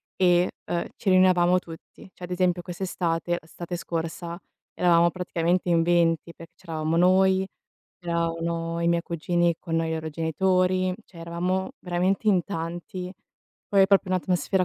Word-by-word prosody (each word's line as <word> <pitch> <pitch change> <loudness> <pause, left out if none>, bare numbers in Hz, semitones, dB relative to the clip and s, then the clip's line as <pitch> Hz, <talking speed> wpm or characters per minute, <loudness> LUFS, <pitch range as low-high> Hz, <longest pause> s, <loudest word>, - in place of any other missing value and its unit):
e, 180 -1 +3 0.2
ehm, 170 - -2
ci 195 - -2
riunivamo 185 -1 +5
tutti. 165 +2 -13
Cioè, 180 - -14
ad 180 - -7
esempio, 180 -1 +1
quest'estate, 175 -2 -2
l'estate 175 +2 -7
scorsa, 170 +1 -4 0.3
eravamo 170 -1 +4
praticamente 180 0 -1
in 165 -1 +3
20 170 -1 +2
perché 165 - -13
c'eravamo 160 -2 -2
noi, 190 +1 +4 0.5
c'erano 170 0 -2
i 170 - +1
miei 170 0 +2
cugini 175 +1 0
con 165 -2 -3
noi 165 0 0
loro 160 0 -3
genitori, 185 +4 +1
cioè, 170 - -16
eravamo 180 +5 -2
veramente 185 +4 -1
in 185 -4 +4
tanti. 175 +1 -5 0.6
Poi 195 -1 +5
è - - +5
proprio 195 -1 +3
un'atmosfera 185 +1 +1
175 Hz, 145 wpm, -25 LUFS, 165-185 Hz, 0.6 s, riunivamo